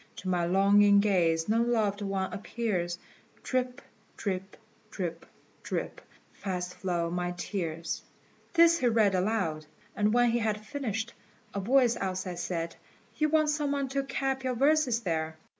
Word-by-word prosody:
To 185 - -5
my 175 -2 +1
longing 200 +2 +5
gaze 170 -5 +2
no 225 +2 +3
loved 220 -4 +1
one 195 -1 -2
appears; 200 -5 -2 0.5
Drip, 255 -1 -2 0.3
drip, 190 -1 -4 0.3
drip, 170 -3 -5 0.3
drip: - - -4 0.3
fast 180 -2 -4
flow 170 -3 -2
my 180 0 -2
tears." 170 -4 -3 0.5
This 335 0 +6
he 250 - +2
read 220 -4 +4
aloud; 180 -6 0 0.3
and 210 0 +2
when 245 0 +4
he 240 - +1
had 215 -2 -1
finished, 235 -5 -3 0.4
a 200 - -2
voice 240 +3 +3
outside 185 -2 -3
said, 170 -1 -3 0.4
"You 305 -1 +2
want 310 -1 +3
some 295 -2 0
one 280 -2 -1
to 275 +1 0
cap 270 -1 -2
your 255 -1 -1
verses 275 -2 +3
there!" 160 -4 -2
205 Hz, 145 wpm, -29 LUFS, 180-245 Hz, 0.5 s, This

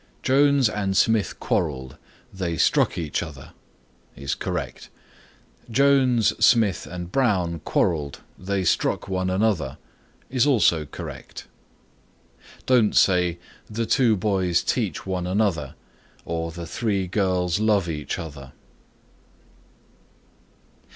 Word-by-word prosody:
"Jones 140 -1 +4
and 100 -3 -1
Smith 110 -4 +2
quarreled; 65 -6 -2 0.4
they 90 -4 -3
struck - - +2
each 80 -4 -2
other" 80 -6 -9 0.6
is 70 0 -3
correct. 90 -7 -5 0.8
"Jones, 130 -2 +3
Smith 110 -10 +3
and 90 0 -7
Brown 95 -10 +1
quarreled; 75 -3 -1
they 95 +1 -2
struck 90 - 0
one 95 -1 -1
another" 95 -8 0 0.5
is 130 +2 +1
also 95 - +3
correct. - - -9 1.2
Don't 120 -5 +3
say, 90 -2 +3 0.3
"The 115 +2 -2
two 120 -3 +3
boys 90 -4 +1
teach - - -2
one 90 -2 -2
another" 90 -8 0 0.5
nor 85 0 -3
"The 85 +1 -7
three 100 +2 -1
girls 90 -1 0
love 105 -4 +2
each 75 -3 -4
other." 70 -4 -9
95 Hz, 105 wpm, -24 LUFS, 85-110 Hz, 1.2 s, Jones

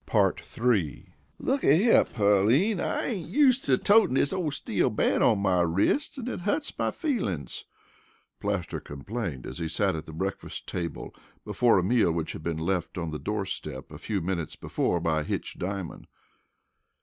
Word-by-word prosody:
III. 110 - 0 0.2
"Looky 260 - +3
here, 225 +6 +5
Pearline, 110 - +3
I - - -1
ain't 195 -10 -3
used 270 -3 +4
to 130 -2 +4
totin' 205 - +4
dis 140 - +2
ole 180 -5 -1
steel 140 - 0
band - - +1
on 110 - +4
my 95 -3 +2
wrist 95 - +1
an' 250 -2 -5
it - - -3
hurts 210 - -2
my - - +1
feelin's," 105 - -3 0.7
Plaster 100 -4 -2
complained 75 - -5
as - - -7
he 85 - -2
sat 95 +3 0
at 80 - -6
the - - -8
breakfast 95 +5 -4
table 85 -2 -5 0.3
before 120 -4 +3
a 90 - +2
meal 110 -3 +3
which 80 -1 -2
had - - -8
been 80 0 -2
left 90 +2 -2
on 85 -3 -3
the 75 - -4
door - - -2
step - - -6
a - - -9
few 100 -3 -2
minutes 85 -2 -3
before - - -1
by 80 -1 0
Hitch - - -4
Diamond. 95 -1 -5
100 Hz, 170 wpm, -27 LUFS, -, 0.7 s, here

